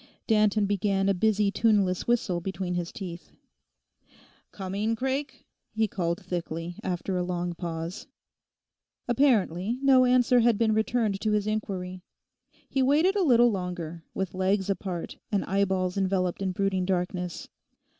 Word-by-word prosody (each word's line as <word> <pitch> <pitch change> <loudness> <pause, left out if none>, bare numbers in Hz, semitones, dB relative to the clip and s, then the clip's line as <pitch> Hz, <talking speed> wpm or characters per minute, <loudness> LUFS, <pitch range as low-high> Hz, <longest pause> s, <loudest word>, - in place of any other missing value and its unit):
Danton 215 -2 +3
began 195 -1 +1
a 200 - +4
busy 210 +1 +2
tuneless 200 -4 +2
whistle 210 -7 +1
between 185 0 -3
his 175 -1 -3
teeth. 180 -4 -8 1.2
'Coming, 200 +3 -2
Craik?' 265 +3 -3 0.3
he 220 0 +2
called 170 -3 -3
thickly, 170 -1 -4
after 185 +1 -2
a - - 0
long 175 -1 -2
pause. 170 +1 -5 1.0
Apparently 230 - +2
no 260 -2 +6
answer 250 0 +4
had 235 -2 +3
been 220 -1 +2
returned 220 -2 0
to 215 -1 +1
his 210 -1 +1
inquiry: 185 -4 -3 0.7
he 270 - 0
waited 305 +9 +3
a 405 - +2
little 240 -7 +5
longer, 175 -4 -5
with 190 -2 -2
legs 190 +1 +1
apart, 185 -3 -5
and 200 -2 0
eyeballs 190 -2 0
enveloped 185 -1 0
in 190 -1 0
brooding 190 0 0
darkness. 180 -1 -2
195 Hz, 135 wpm, -27 LUFS, 180-220 Hz, 1.2 s, no